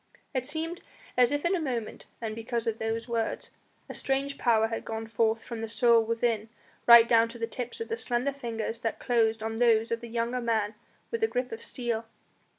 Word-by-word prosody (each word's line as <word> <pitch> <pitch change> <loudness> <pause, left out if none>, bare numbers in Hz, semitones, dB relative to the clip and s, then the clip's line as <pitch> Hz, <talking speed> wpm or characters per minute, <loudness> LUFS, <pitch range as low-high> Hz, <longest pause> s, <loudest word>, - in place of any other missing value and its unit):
It 260 -2 -2
seemed 325 +3 -4 0.3
as 250 0 +5
if 290 +3 -1
in 360 +3 +3
a 350 - -1
moment 245 -7 -4
and 220 -2 -3
because 230 +1 -3
of 225 -1 -1
those 225 +1 -2
words 230 -2 -2 0.4
a - - -7
strange 275 +1 -1
power 225 -2 +3
had 225 - -3
gone 225 0 -4
forth 225 0 +1
from 230 -2 -6
the 225 - -3
soul 230 +1 +4
within 225 -1 0 0.4
right 235 -1 +10
down 230 -1 +4
to 235 - -9
the 230 - -1
tips 245 - -5
of 455 - -4
the 455 - -2
slender 260 - 0
fingers 230 -4 -4
that 225 -2 -2
closed 225 -3 +1
on 225 0 -3
those 230 -1 +3
of 230 0 -1
the 235 - -8
younger 235 +2 -1
man 220 -3 0 0.4
with 460 -1 -2
a 445 - +4
grip 250 - -2
of 225 0 -6
steel. 230 -2 -3
230 Hz, 210 wpm, -28 LUFS, 225-250 Hz, 0.4 s, right